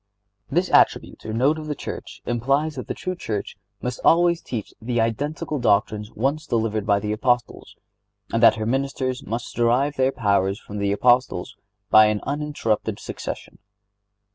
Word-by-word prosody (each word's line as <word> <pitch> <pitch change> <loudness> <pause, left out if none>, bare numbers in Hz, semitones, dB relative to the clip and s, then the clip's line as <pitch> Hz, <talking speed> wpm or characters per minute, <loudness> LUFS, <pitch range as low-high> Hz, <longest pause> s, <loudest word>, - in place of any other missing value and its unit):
This 175 +6 0
attribute - - +3
or - - -3
note 135 +8 +2
of 155 - -7
the 150 - -2
Church - - -7
implies 135 +6 0
that 130 -3 -7
the - - -3
true 185 - -3
Church 105 - -4 0.3
must 125 0 -3
always 170 0 +4
teach 110 -5 -5
the 120 +1 -1
identical 145 +6 -1
doctrines 105 -1 +1
once 140 +7 -1
delivered 110 -3 -1
by 100 -1 +4
the 105 0 -3
Apostles, 120 +2 -1 0.6
and 115 - +1
that 115 - +7
her 110 -1 -3
ministers 130 +1 -1
must 115 +2 -5
derive 125 +5 +2
their 130 0 +3
powers 100 -4 +1
from 105 -2 -8
the 100 0 0
Apostles 125 +1 +2 0.4
by 110 0 +8
an 105 -1 0
uninterrupted 145 -6 -2
succession. - - -7
120 Hz, 160 wpm, -23 LUFS, 110-140 Hz, 0.6 s, by